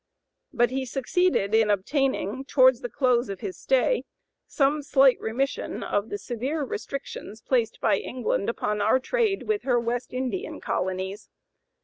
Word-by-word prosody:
But 240 +1 +2
he 265 0 -1
succeeded 265 - 0
in 220 -1 +4
obtaining, 260 +2 0
towards 260 -2 +5
the 245 - -4
close 245 -2 +1
of 195 -2 -6
his 370 - -4
stay, - - +1 0.4
some 290 +1 +1
slight 270 -2 +4
remission 265 +5 -2
of 205 +2 -1
the 205 - -3
severe 260 +8 -3
restrictions 245 -3 -6
placed 235 -1 0
by - - +3
England 245 -4 -2
upon 210 -2 -1
our 220 +5 +4
trade 435 - 0
with 430 -1 0
her 245 -3 +2
West 235 +1 -3
Indian 260 - -3
colonies. 190 +2 -3
255 Hz, 145 wpm, -26 LUFS, 220-275 Hz, 0.4 s, towards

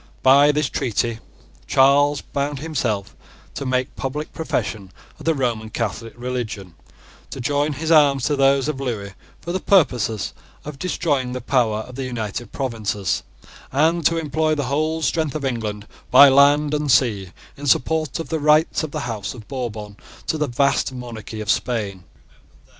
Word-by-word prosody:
By 140 +2 +6
this 150 -1 0
treaty 115 -2 -1 0.5
Charles 140 +2 +4
bound 140 +1 -3
himself 125 -10 -2 0.4
to 140 - -4
make 130 +1 -1
public 145 +3 -4
profession 110 - -3 0.3
of 150 - -11
the 165 -1 +2
Roman 115 -5 -1
Catholic 115 0 -4
religion, 120 -7 -5 0.6
to - - -7
join 145 +4 0
his 160 +4 -3
arms 145 -4 +5
to 150 - +1
those 135 0 +3
of 150 -3 -3
Lewis 110 -7 -4 0.3
for 170 - -5
the 185 - -1
purpose 155 - +3 0.6
of 150 -1 -8
destroying 145 -8 -1
the 130 - -3
power 115 -4 +1
of 125 - -11
the 135 +2 -4
United 120 -2 -4
Provinces, 110 -7 -2 0.5
and 160 +5 +2
to 165 - 0
employ 155 0 0
the 145 - -1
whole 155 +2 0
strength 155 +1 0
of 150 -2 -3
England, 110 -5 -3 0.2
by 140 +2 +9
land 145 +2 +4
and 150 -2 0
sea, 105 -8 +2 0.3
in 145 +1 -7
support 155 +4 +1
of 160 -5 -5
the 160 - -1
rights 150 +2 +3
of 155 - -4
the - - -4
House 110 -2 -4
of 110 -4 -12
Bourbon 110 -6 -5 0.3
to 155 - -1
the 150 - +1
vast 140 +2 +1
monarchy 115 -4 -7
of 105 0 +1
Spain. 100 -7 -2
135 Hz, 165 wpm, -21 LUFS, 115-150 Hz, 0.6 s, by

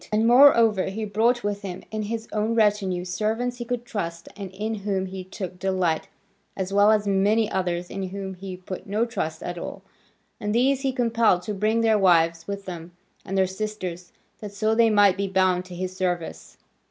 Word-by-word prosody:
And 215 +1 +2
moreover 235 -5 +6
he 215 +3 -3
brought 230 +4 +1
with 205 0 -2
him 190 -3 -6
in 215 0 -3
his 225 +2 -4
own 215 +2 0
retinue 205 -5 +1
servants 220 +7 -2
he 240 - -5
could 245 0 -3
trust 170 -7 -5
and 200 -2 -6
in 210 +4 -4
whom 195 -2 -1
he 190 0 -6
took 185 -1 -7
delight, 185 -4 0 0.5
as 190 0 -3
well 205 +1 +5
as 215 -1 +3
many 205 +3 +3
others 180 -1 -2
in 195 -1 -4
whom 195 0 -5
he 185 0 -8
put 185 0 -8
no 210 +4 +1
trust 160 -9 -4
at 175 -1 -5
all, - - -7 0.6
and 210 -1 -2
these 265 +3 +3
he 270 -1 0
compelled 230 -7 +2
to 210 - -3
bring 215 +3 +1
their 220 -2 +3
wives 165 -3 +3
with 200 0 -5
them, 175 -1 -8 0.3
and 195 - -3
their 190 - +4
sisters, 185 -3 -5 0.3
that 210 -2 -7
so 215 +2 +1
they 230 0 +4
might 205 -3 +5
be 200 0 -1
bound 185 -1 +2
to 180 -1 -10
his 185 +1 -4
service. 175 -3 -3
200 Hz, 195 wpm, -24 LUFS, 185-220 Hz, 0.6 s, moreover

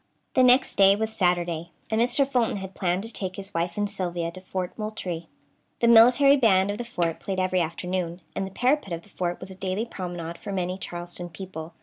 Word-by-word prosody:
The 260 - +4
next 255 +1 +5
day 195 0 +7
was 220 +1 -2
Saturday, 175 -4 0 0.2
and 220 +1 +2
Mr. 250 +3 +2
Fulton 245 -6 +1
had 190 -1 -7
planned 180 +1 0
to 225 +1 -7
take 185 -2 -3
his 195 0 -8
wife 170 +2 -1
and 205 0 +1
Sylvia 175 -4 -3
to 185 - -11
Fort 185 -1 -4
Moultrie. 185 -6 -5 0.5
The 235 - +3
military 245 +5 +7
band 200 -6 +4
of 205 - -5
the - - -2
fort 175 -8 -2
played 190 -1 -3
every 185 -1 +2
afternoon, 175 +1 -3
and 195 - -2
the - - -7
parapet 250 - +1
of 170 0 -5
the - - -20
fort 175 -2 -3
was 185 +1 -8
a - - -9
daily 190 +3 -2
promenade 175 -6 -6
for 205 - -6
many 185 -1 -2
Charleston 175 0 -6
people. 165 -1 -8
190 Hz, 215 wpm, -26 LUFS, 175-220 Hz, 0.5 s, day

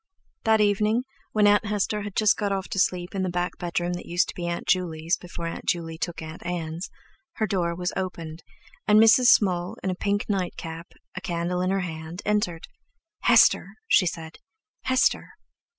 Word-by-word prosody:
That 220 0 +4
evening, 210 +3 +2 0.3
when 215 -1 +3
Aunt 205 +1 +4
Hester 210 0 -1
had 205 -1 -7
just 215 -2 +4
got 205 -1 -2
off 195 0 -2
to 195 - -2
sleep 180 -1 0
in 195 - -2
the 185 - 0
back 175 0 -2
bedroom 175 0 -2
that 175 - -6
used 175 +1 +1
to - - -5
be 175 -1 -5
Aunt 170 0 -4
Juley's 165 -2 +1
before 175 -1 -8
Aunt 165 - -5
Juley 165 -2 -2
took 165 0 -4
Aunt 160 +1 -9
Ann's, 170 0 -4 0.4
her 220 - -1
door 175 -4 -1
was 180 +1 -3
opened, 170 -4 -5 0.5
and 210 0 +6
Mrs. 235 +3 +6
Small, 185 -1 +3
in 190 - 0
a - - -1
pink 200 +2 -1
night 190 -4 -2
cap, 165 0 -8 0.2
a 180 - -5
candle 175 0 -2
in 185 - 0
her 195 0 +1
hand, 165 +1 -6
entered: 200 -6 -1 0.5
"Hester!" - - +4
she 185 - +4
said. 160 -1 -6 0.5
"Hester!" 260 0 +1
180 Hz, 185 wpm, -25 LUFS, 170-205 Hz, 0.5 s, and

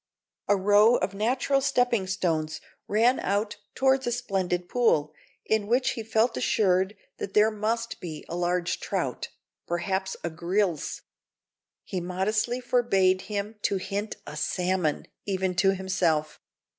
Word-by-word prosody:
A 205 - +4
row 205 +4 +5
of 185 -2 -1
natural 255 +6 +1
stepping 245 -7 +1
stones 160 -5 -1 0.3
ran 230 +5 +3
out 205 +2 -1 0.2
towards 265 -1 +2
a - - +1
splendid 190 -7 -1
pool, 155 -12 +2 0.3
in 220 -2 +1
which 250 +3 +2
he 230 - -4
felt 225 +2 +1
assured 190 -1 +2 0.2
there 210 +2 +3
must 225 +2 -2
be 160 -4 -7
a 170 - -5
large 175 0 0
trout - - -3 0.4
perhaps 190 +2 -2
a 170 - -2
grilse. 175 0 -1 0.8
His 185 - -3
modesty 215 +7 0
forbade 195 -7 +2
him 210 +1 -4
to 200 - +1
hint 205 +3 -3
"a 150 - -8
salmon," 180 0 0 0.2
even 190 -2 0
to 195 +1 +4
himself. 175 -5 0
195 Hz, 130 wpm, -27 LUFS, 180-225 Hz, 0.8 s, row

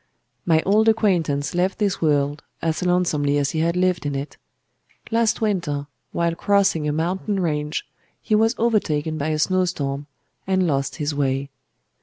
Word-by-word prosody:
My 160 -1 +4
old 215 +3 +4
acquaintance 170 -10 +1
left 180 +2 0
this 205 -3 0
world 145 -1 +1 0.2
as 160 -1 -1
lonesomely 165 -6 +1
as 140 -1 +1
he 160 - -2
had 170 +2 +1
lived 185 -1 +1
in 145 -1 -2
it. 140 +2 -5 0.8
Last 230 0 +2
winter, 170 -10 -1 0.3
while 170 0 0
crossing 195 -4 +2
a - - +1
mountain 185 +6 -1
range, 150 -3 -1 0.3
he - - -3
was 225 +3 +3
overtaken 160 -9 0
by 145 - -1
a 155 -1 0
snowstorm, 150 -5 0 0.4
and 190 -1 +2
lost 140 -4 0
his 150 -2 -2
way. 135 -1 -1
165 Hz, 155 wpm, -22 LUFS, 145-190 Hz, 0.8 s, My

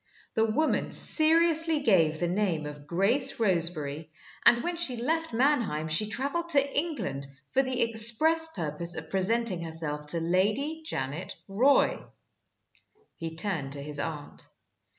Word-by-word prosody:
The 220 - +1
woman 290 +9 -1
seriously 325 -1 +5
gave 165 - +2
the 175 - -1
name 175 -4 -1
of 145 0 -10
Grace 225 - 0
Roseberry, 165 -7 -1 0.3
and 240 0 +5
when 350 0 -3
she 305 -8 -1
left 320 +6 -2
Mannheim 235 - 0
she 190 +8 +1
traveled 280 +9 -3
to 280 -3 +2
England 235 - -3 0.2
for 265 - +2
the 260 -2 -1
express 240 +9 +3
purpose 170 - -2
of 160 0 -8
presenting 195 0 +1
herself 160 -3 -3
to 170 +3 0
Lady 210 - -1
Janet 160 - -5
Roy." 245 +9 +2 1.1
He 165 -1 -7
turned 160 -7 -3
to 140 -1 -6
his 145 0 -5
aunt. 150 -2 -6
210 Hz, 135 wpm, -27 LUFS, -, 1.1 s, seriously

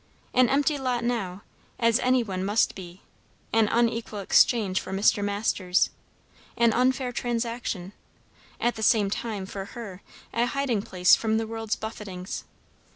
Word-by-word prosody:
An 255 -1 +4
empty 285 +2 +2
lot 250 -2 -1
now, 200 -6 -2 0.4
as 230 -1 +3
any 255 -1 +3
one 190 -4 -4
must 205 +3 +2
be; 180 0 -11 0.5
an 225 -1 +4
unequal 230 -2 0
exchange 200 0 +3
for - - -8
Mr. 200 +1 +2
Masters; 200 -3 +1 0.7
an 235 -1 +4
unfair 255 +1 +1
transaction; 230 -6 -3 0.7
at 240 - +1
the 220 - -8
same 210 -2 +3
time, 210 -3 -3
for 195 0 -6
her, 200 -3 -9 0.3
a 235 +1 +1
hiding 265 -6 0
place 180 -2 +4
from 220 -1 0
the 225 - -1
world's 225 0 -3
buffetings. 195 -4 -6
225 Hz, 145 wpm, -26 LUFS, 195-240 Hz, 0.7 s, An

